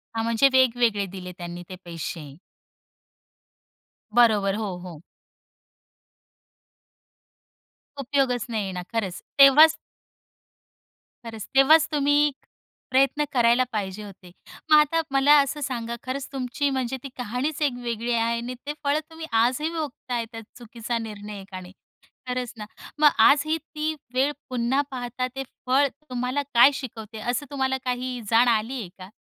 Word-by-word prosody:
हां, 225 - -1
म्हणजे 230 +4 +4
वेगवेगळे 240 -5 +3
दिले 180 -1 -7
त्यांनी 175 0 -7
ते 185 - -7
पैसे. 165 -3 -6 1.8
बरोबर. 210 -4 +4
हो, 205 -5 -4
हो. 175 -3 -10 3.0
उपयोगच 265 -3 0
नाहीये 210 -4 -2
ना, 180 -1 -5
खरंच. 195 -6 -2 0.2
तेव्हाच 300 +4 +8 1.5
खरंच, 225 -2 -7
तेव्हाच 310 +4 +6
तुम्ही 290 0 +3 0.6
प्रयत्न 275 +3 +3
करायला 240 0 +4
पाहिजे 205 -1 -4
होते. 190 -3 -13 0.4
मग 305 - +9
आता 300 +2 +3
मला 275 +2 +5
असं 290 +2 -3
सांगा 235 -3 -3
खरंच 260 +1 -4
तुमची 270 +2 -1
म्हणजे 265 -1 -2
ती 275 - -6
कहाणीच 250 +6 -3
एक 285 -4 +2
वेगळी 235 0 -3
आहे 230 0 +1
आणि 240 +2 -5
ते 295 - -3
फळ 285 +1 +2
तुम्ही 320 0 -8
आजही 245 +7 +2
भोगताय, 250 -6 -4
त्या 225 0 -8 0.2
चुकीचा 235 0 -5
निर्णय 210 -2 -7
एकाने. 185 -1 -10 0.6
खरंच 250 -1 -3
ना, 210 - -7 0.3
मग 300 -1 +7 0.2
आजही 310 +3 +3
ती 310 0 -4 0.2
वेळ 270 +3 +2 0.2
पुन्हा 250 +3 +1
पाहता 250 0 -3
ते 270 - -3 0.2
फळ 270 +3 +3 0.2
तुम्हाला 250 +3 -2
काय 240 +4 +7
शिकवते? 225 -5 -7
असं 245 +5 -2
तुम्हाला 265 -1 0
काही 250 0 -3
जाण 235 +2 +5
आली 235 +3 0
आहे 180 - -8
का? 185 +1 -10
245 Hz, 135 wpm, -24 LUFS, 220-275 Hz, 3.0 s, मग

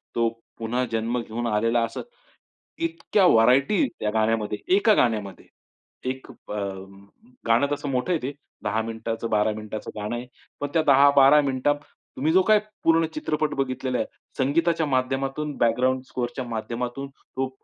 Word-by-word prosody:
तो 115 -1 +2 0.3
पुन्हा 120 +2 -1
जन्म 115 +2 -1
घेऊन 120 +1 -4
आलेला 115 +2 +2
असं, 115 - -6 0.8
इतक्या 330 - +1
व्हरायटी 135 - +4
त्या 105 - 0
गाण्यामध्ये, 110 -1 0 0.2
एका 215 +2 +4
गाण्यामध्ये. 105 - 0 0.6
एक 130 0 -6
अ, - - -10 0.9
गाणं 115 +4 +4
तसं 145 0 -3
मोठं 130 +7 0
आहे 165 - 0
ते 135 +3 -3 0.3
10 110 +1 0
मिनिटाचं, 115 0 -4
12 105 0 +2
मिनिटाचं 110 0 -6
गाणं 105 +3 -3
आहे, 120 +1 -6 0.3
पण 145 - -2
त्या 165 - +4
10-12 140 0 +6
मिनिटांत 140 +1 +1 0.4
तुम्ही 155 +4 +1
जो 185 +2 +5
काही 215 +2 +4 0.2
पूर्ण 165 0 +4
चित्रपट 155 0 -1
बघितलेला 130 -1 -1
आहे - - -1 0.3
संगीताच्या 160 +4 +2
माध्यमातून, 135 +2 -1
बॅकग्राउंड 125 +3 +2
स्कोरच्या 125 +1 -3
माध्यमातून 120 +4 -4
तो 135 -1 -5
130 Hz, 145 wpm, -25 LUFS, 115-145 Hz, 0.9 s, 10-12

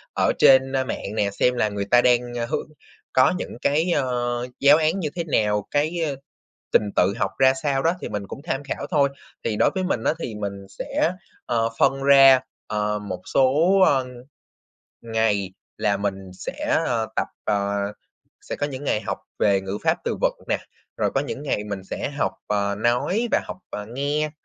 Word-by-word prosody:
ở - - +3
trên, 135 0 +6
ơ, 130 - +1
mạng 105 -4 -5
nè, 105 -2 +1
xem 125 +5 +2
là 110 -3 +1
người 100 -1 -3
ta 120 +4 +5
đang, 125 -1 +4
ờ, 120 -1 -2
hướng 120 - -3 0.5
có 130 +5 +5
những - - -6
cái, 160 +5 +2
ờ, 120 -4 -1
giáo 140 +2 +7
án 160 +4 +1
như 155 - -2
thế 170 - -1
nào, 105 -9 0
cái, 150 +4 +1
ờ, 140 - -3 0.6
trình 105 - +3
tự 95 +2 +3
học 100 -4 0
ra 130 0 +5
sao 140 -2 +1
đó, 165 +2 +3
thì - - -5
mình 100 -1 -4
cũng 135 - -8
tham 145 -4 -3
khảo 140 - -4
thôi. 145 -4 +3 0.3
Thì 110 -2 -1
đối - - +4
với 190 - 0
mình 150 -11 -1
á, - - +2
thì 115 -9 -5
mình 100 -1 -5
sẽ, 165 - -1 0.3
ờ, 115 -1 +1
phân 135 0 +3
ra, 135 -1 +8 0.3
ờ, 105 0 -1
một 95 -3 -6
số, 130 -1 +4 0.3
ơ, 130 -2 +2 1.0
ngày 110 -4 0 0.3
là 105 -2 +1
mình 95 -2 -4
sẽ, 95 - -2
ờ, - - 0
tập - - +1 0.2
ờ, 100 0 0 0.7
sẽ - - -6
có 145 - -1
những 140 -1 -7
ngày 105 - +1
học - - -4 0.2
về 100 -2 +3
ngữ 95 +1 -4
pháp, - - +3
từ - - -1
vựng - - +1
nè, - - +1 0.4
rồi - - +1
có - - +3
những 140 - -5
ngày 105 -8 -1
mình 100 -2 -5
sẽ, 135 - -4
ờ, - - -8
học - - +1 0.5
nói 125 - +1
và - - +4
học, - - -7
ờ, 105 0 -5
nghe. 145 +5 -1
120 Hz, 200 wpm, -23 LUFS, 105-140 Hz, 1.0 s, ra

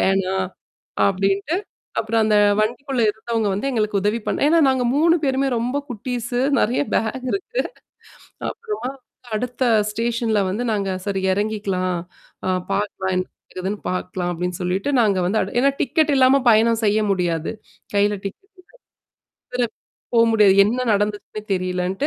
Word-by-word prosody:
வேணாம். 190 -1 +1 0.6
அப்பிடின்னுட்டு. 195 - +1 0.4
அப்புறம் 225 0 +1
அந்த 215 -1 +3 0.2
வண்டிக்குள்ள 245 +3 -1
இருந்தவங்க 220 0 -2
வந்து 205 +8 -1
எங்களுக்கு 215 -4 0
உதவி 210 +3 +1
பண்ண - - 0
ஏன்னா, 335 +2 +4
நாங்க 260 -1 +2
3 330 +2 +5
பேருமே 270 0 +1
ரொம்ப 245 +4 -1
குட்டீஸு. 245 +1 -3 0.2
நிறைய 240 +6 +2
பேக் 250 +4 -1
இருக்கு. 445 +5 -2 0.9
அப்புறமா, 425 - -5 0.5
அடுத்த 250 +3 -2 0.3
ஸ்டேசன்ல 230 0 0
வந்து 210 +6 -2
நாங்க 200 -2 -1 0.2
சரி. 200 -2 -1
இறங்கிக்கலாம். 195 -3 -1 0.5
அ - - +1 0.2
பார்க்கலாம். 195 -1 -1
என்ன 185 0 -1
நடக்குதுன்னு 190 +3 -5
பார்க்கலாம். 180 -1 -3
அப்பிடின்னு 180 +1 -3
சொல்லிட்டு, 185 +7 -1
நாங்க 200 -4 +2
வந்து 215 +4 +1
அடு 190 - -4
ஏன்னா, 275 +1 +4
டிக்கெட் 305 +1 +2
இல்லாம 265 +1 +5
பயணம் 225 +1 +4
செய்ய 210 +1 +3
முடியாது. 170 -4 -1 0.4
கைல 205 +1 +3
டிக்கெட் 385 - -8 0.8
இல்ல. - - -73 0.2
வேற 250 -1 +2 0.5
போ 230 - +6
முடியாது. 210 -3 +5
என்ன 250 +4 -1
நடந்துச்சுன்னு 205 +1 -2
தெரியலன்ட்டு, 185 +5 -1
215 Hz, 140 wpm, -21 LUFS, 195-245 Hz, 0.9 s, போ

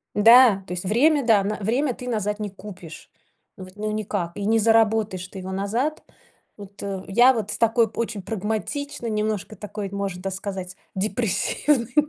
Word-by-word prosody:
Да, 225 -1 +7
то 180 - -5
есть 180 +1 -4
время, 275 +7 +3
да, 215 -4 +4
на 210 +2 -1
время 245 +7 0
ты 250 - -9
назад 210 -3 -2
не 210 -1 -3
купишь. 185 -5 -11 0.5
Вот 185 0 -11
ну 215 +1 -3
никак, 205 -5 -3
и 205 - -4
не 225 +2 +3
заработаешь 220 -4 +2
ты 190 - -9
его 190 0 -6
назад. 230 +11 -2 0.5
Вот, 200 -1 -12
э, 195 -2 -4
я 240 +6 +5
вот 215 -4 -3
с - - -4
такой 230 0 +3
очень 220 -2 -3
прагматичной 225 +6 -3
немножко, 215 0 -2
такой, 205 0 -6
можно, 200 -2 -4
да, 195 - -2
сказать, 190 -1 -5 0.2
депрессивной, 230 +5 0
210 Hz, 170 wpm, -23 LUFS, 195-230 Hz, 0.5 s, Да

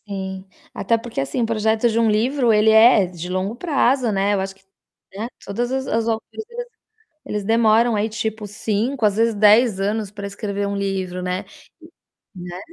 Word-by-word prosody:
Sim. 190 -1 -6 0.3
Até 230 +4 0
porque, 230 - -5
assim, 135 - -2
o - - +2
projeto 220 +1 +1
de 225 0 0
um 230 -1 +3
livro 240 +3 +2
ele 215 0 +4
é 220 -2 +6
de 175 -1 -8
longo 185 +4 -2
prazo, 265 -5 +1
né. 200 +1 +1
Eu 195 - 0
acho 195 0 -5
que, 195 - -27 0.5
né, 215 +3 -4 0.2
todas 240 +5 -3
as 265 0 -2
as 225 0 0
autoras 225 -1 0 0.3
às 470 - -14
vezes, 485 0 -6 0.5
eles 210 -1 -4
demoram 225 +1 +3
aí, 210 +1 0
tipo, 220 -1 -4
5, 220 +5 -2
às 205 -1 +1
vezes, 230 0 +2
10 210 +1 +5
anos 205 +1 -1
pra 200 -1 -7
escrever 200 0 -4
um 200 0 -3
livro, 190 -2 -3
né. 180 +2 -3 0.9
E - - -8
né. 175 0 -7
215 Hz, 195 wpm, -21 LUFS, 195-230 Hz, 0.9 s, é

